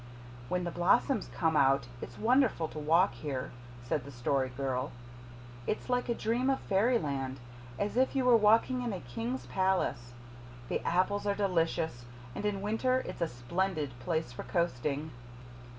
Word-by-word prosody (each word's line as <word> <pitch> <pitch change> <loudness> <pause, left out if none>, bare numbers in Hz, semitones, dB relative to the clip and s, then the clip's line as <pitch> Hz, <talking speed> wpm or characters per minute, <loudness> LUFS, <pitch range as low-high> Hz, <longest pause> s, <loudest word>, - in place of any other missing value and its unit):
"When 180 0 0
the 175 - -2
blossoms 200 - +2
come 160 -2 +1
out 135 -2 +4 0.2
it's 120 - -8
wonderful 240 - +3
to 155 - -7
walk 165 +6 +3
here," 130 +1 -4 0.3
said 125 +2 -1
the 140 - -10
Story 130 +1 0
Girl. 130 +1 -2 0.8
"It's 215 - -2
like 250 0 0
a 235 - +1
dream 240 +5 0
of 270 - +2
fairyland 150 - 0 0.4
as 205 +1 -2
if 260 +2 +3
you 265 -2 +2
were 250 -1 +7
walking 225 +4 +4
in 240 -3 -2
a 190 - -4
king's 120 +1 -4
palace. 125 -5 0 0.6
The - - 0
apples 195 +4 +1
are 200 - +2
delicious, 165 -9 0 0.3
and 210 - -2
in 200 -2 -2
winter 255 +5 +1
it's - - -7
a 170 - +2
splendid 155 +4 -2
place 160 0 -1
for 120 - -7
coasting." 155 -3 -1
170 Hz, 160 wpm, -31 LUFS, 135-210 Hz, 0.8 s, were